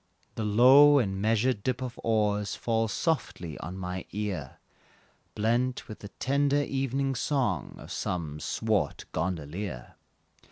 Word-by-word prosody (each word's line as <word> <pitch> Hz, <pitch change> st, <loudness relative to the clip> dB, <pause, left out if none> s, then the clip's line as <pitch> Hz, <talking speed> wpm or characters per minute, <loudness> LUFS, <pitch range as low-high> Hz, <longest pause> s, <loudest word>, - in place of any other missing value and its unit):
The 110 Hz, -, -4 dB
low 130 Hz, +7 st, +7 dB
and 95 Hz, -7 st, 0 dB
measured 110 Hz, +1 st, +2 dB
dip 125 Hz, +3 st, -1 dB
of 125 Hz, -2 st, -6 dB
oars 105 Hz, -2 st, +1 dB
Falls 115 Hz, -2 st, 0 dB
softly 95 Hz, -, -2 dB
on 90 Hz, +5 st, -6 dB
my 90 Hz, -1 st, -5 dB
ear 95 Hz, -9 st, -4 dB, 0.8 s
Blent 120 Hz, +4 st, 0 dB
with 110 Hz, -, -9 dB
the 100 Hz, -, -8 dB
tender 140 Hz, +6 st, +1 dB
evening 135 Hz, 0 st, -1 dB
song, 120 Hz, -, -1 dB
Of -, -, -11 dB
some 80 Hz, -4 st, -3 dB
swart 110 Hz, +3 st, -1 dB
gondolier. 85 Hz, -4 st, -4 dB
110 Hz, 125 wpm, -28 LUFS, 95-130 Hz, 0.8 s, low